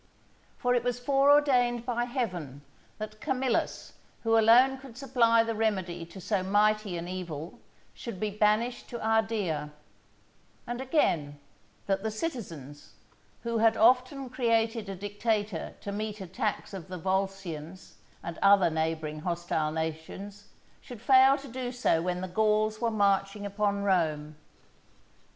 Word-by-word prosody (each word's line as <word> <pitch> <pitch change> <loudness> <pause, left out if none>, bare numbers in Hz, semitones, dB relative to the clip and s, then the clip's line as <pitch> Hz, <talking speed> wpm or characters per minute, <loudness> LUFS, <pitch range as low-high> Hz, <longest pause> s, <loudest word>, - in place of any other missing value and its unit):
For 245 0 +1
it 245 -1 +1
was 245 0 -1
fore 275 +2 +3
ordained 250 -5 +4
by 240 -1 -1
Heaven 180 - -4 0.3
that 215 0 -7
Camillus, 260 -1 -1 0.3
who 225 -1 +3
alone 245 +4 +5
could 260 -3 -13
supply 235 -4 +3
the 230 0 -2
remedy 190 -6 -1
to 180 +3 -11
so 195 +2 -1
mighty 205 0 +2
an 170 +1 -5
evil, 175 -3 -6 0.3
should 230 -6 -7
be 215 -1 -1
banished 215 +4 +1
to 240 - -5
Ardea; 220 -9 0 1.0
and 240 +1 -4
again, 170 - +1 0.5
that 195 -1 0
the 220 - -2
citizens, 185 - -6 0.5
who 235 -1 -1
had 225 0 +4
often 255 +3 +3
created 230 -3 0
a 195 - -4
dictator 205 -1 -2
to 200 - -5
meet 210 +1 -4
attacks 190 +3 -3
of 185 -5 -7
the 185 - -6
Volscians 190 -2 -4 0.3
and 170 0 -6
other 195 -3 +5
neighbouring 160 -1 -2
hostile 170 -2 -1
nations, 160 +6 -5 0.3
should 245 -3 -10
fail 265 +3 +6
to 280 0 -10
do 250 0 -4
so 245 -10 +1
when 180 +1 -2
the 185 - -3
Gauls 215 +3 +1
were 235 - +2
marching 200 -1 +1
upon 200 0 -1
Rome. 155 -6 0
210 Hz, 140 wpm, -29 LUFS, 180-235 Hz, 1.0 s, fail